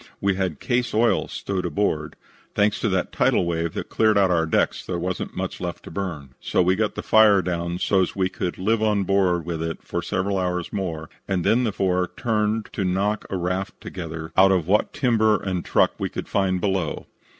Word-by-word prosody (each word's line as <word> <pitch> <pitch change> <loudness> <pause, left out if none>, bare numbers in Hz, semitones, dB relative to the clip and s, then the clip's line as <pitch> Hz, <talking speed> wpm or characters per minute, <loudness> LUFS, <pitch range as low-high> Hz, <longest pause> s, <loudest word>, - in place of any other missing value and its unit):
We 100 0 +1
had 95 -1 -2
case 120 -2 -1
oil 115 +2 +2
stowed 90 -3 -3
forward. 75 -7 0 0.4
Thanks 105 +1 +2
to 110 - 0
that 95 -2 0
tidal - - +2
wave 85 -1 -2
that - - -4
cleared 110 -2 +3
our 90 -4 +3
decks - - +1
there 90 - -3
wasn't 90 +1 -4
much - - -4
left - - -5
to - - -10
burn, 80 -7 -4
so - - +1
we 90 +2 +3
got 105 +1 -1
the - - -4
fire 105 -3 +5
down 85 0 -2
so's 95 0 +1
we 95 -2 +1
could 90 -1 -4
live 110 +4 +1
on 105 -2 +2
board 95 -3 +1
with 85 -2 -3
it 80 0 -4
for 85 - -3
several 95 +2 -1
hours 90 -1 -2
more 80 -5 -3 0.2
and 95 -3 0
then 120 +6 +3
the 110 - 0
four 90 -2 0
turned 110 -2 0
to - - -17
to 95 - -2
knock 100 +3 0
a 95 - -2
raft 90 +2 -3
together 80 -2 -7
out 95 +1 +6
of 90 -4 +2
what 105 +3 +2
timber 110 -6 +2
and 95 -3 -3
truck - - +3
we - - -1
could - - -6
find 95 -2 +1
below. 95 -5 -1
95 Hz, 205 wpm, -23 LUFS, 90-105 Hz, 0.4 s, out